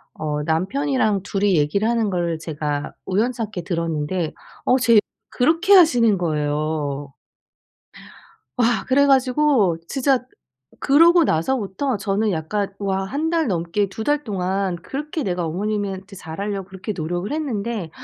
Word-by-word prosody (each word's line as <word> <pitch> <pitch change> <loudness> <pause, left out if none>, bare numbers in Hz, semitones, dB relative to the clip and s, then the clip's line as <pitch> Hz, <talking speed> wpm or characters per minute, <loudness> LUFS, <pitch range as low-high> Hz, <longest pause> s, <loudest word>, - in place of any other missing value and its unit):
어 150 -1 -3
남편이랑 205 - 0
2 195 +1 -3
이 195 -3 +4
얘기를 160 +9 +1
하는 230 -3 +1
걸 170 -3 -1
제가 150 -2 -4
우연찮게 220 -1 -1
들었는데 165 -1 -2 0.3
어 255 - +4
제 235 -3 +5 0.3
그렇게 330 +9 +3
하시는 245 - +6
거예요. 150 -3 -2 1.4
와 240 -1 +2
그래 280 +2 +4
가지고 260 - +3
진짜 270 -2 +1 0.5
그러고 335 +4 +5
나서부터 225 - 0
저는 205 +1 0
약간 195 +5 -2
와 195 -1 -1
1 285 +11 -2
달 330 -4 +1
넘게 180 +2 0
2 220 +3 -6
달 295 +2 +1
동안 190 -4 -2
그렇게 295 - -5
내가 180 -2 -1
어머님한테 195 +2 -3
잘 160 -3 -9
하려고 200 -2 -3
그렇게 190 +3 -5
노력을 175 - -3
했는데 230 - -3
200 Hz, 275 characters per minute, -21 LUFS, 170-250 Hz, 1.4 s, 하시는